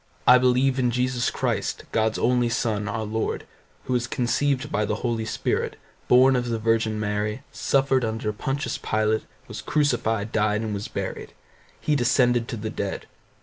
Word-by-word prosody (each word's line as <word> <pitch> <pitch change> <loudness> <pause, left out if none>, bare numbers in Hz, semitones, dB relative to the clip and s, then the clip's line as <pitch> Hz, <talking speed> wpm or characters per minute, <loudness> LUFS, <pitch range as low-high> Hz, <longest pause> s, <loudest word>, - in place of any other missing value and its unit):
I 125 0 +8
believe 130 +1 +3
in 125 -1 +2
Jesus 125 0 0
Christ, - - -2
God's 110 0 +1
only 125 0 +2
Son, 110 -4 -1
our 110 +1 -2
Lord, 110 +1 -2 0.4
who 130 - -2
was 120 0 0
conceived 135 +3 0
by 105 - +1
the 105 +3 -2
Holy 115 -2 -1
Spirit, 110 0 -1 0.3
born 130 +2 +6
of 120 -1 -1
the 115 - 0
Virgin 110 -1 +1
Mary, 105 +3 -2
suffered 135 -2 +1
under 110 -1 -2
Pontius 135 +7 -3
Pilate, 110 0 0 0.2
was - - -7
crucified, 115 -8 0
died, 105 0 +1
and 110 -2 -3
was 100 0 -4
buried; - - -5 0.5
he 150 - +1
descended 125 -2 +3
to 115 - -4
the 110 0 -4
dead. 100 -3 -4
115 Hz, 165 wpm, -25 LUFS, 110-125 Hz, 0.5 s, I